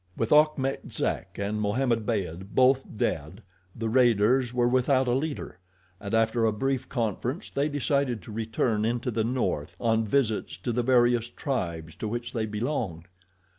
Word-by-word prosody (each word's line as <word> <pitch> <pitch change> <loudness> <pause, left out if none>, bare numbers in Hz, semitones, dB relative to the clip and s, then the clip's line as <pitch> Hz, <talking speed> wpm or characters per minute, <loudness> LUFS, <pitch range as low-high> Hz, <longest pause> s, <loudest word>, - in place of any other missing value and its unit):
With 115 - -1
Achmet 150 -3 +2
Zek - - -3
and 105 +2 -2
Mohammed 115 +1 0
Beyd 95 -3 -3
both 130 +1 +5
dead, 85 +4 -2 0.3
the 115 - -3
raiders 120 +1 +3
were 120 -1 +2
without 130 +1 +3
a 125 - 0
leader, 140 - -3 0.4
and 100 - -6
after 115 +1 +2
a 110 - +4
brief 130 +4 -2
conference 120 - -2
they 140 +2 0
decided 140 - 0
to - - -10
return 110 0 -1
into 120 +2 -1
the 110 0 0
north 125 +3 -1
on 115 -1 +2
visits 115 -3 0
to 120 - 0
the 120 +1 0
various 120 -1 +3
tribes 85 - -3
to 110 - -4
which 120 +2 -4
they 110 -3 -1
belonged. 105 - -3
120 Hz, 160 wpm, -27 LUFS, 105-130 Hz, 0.4 s, both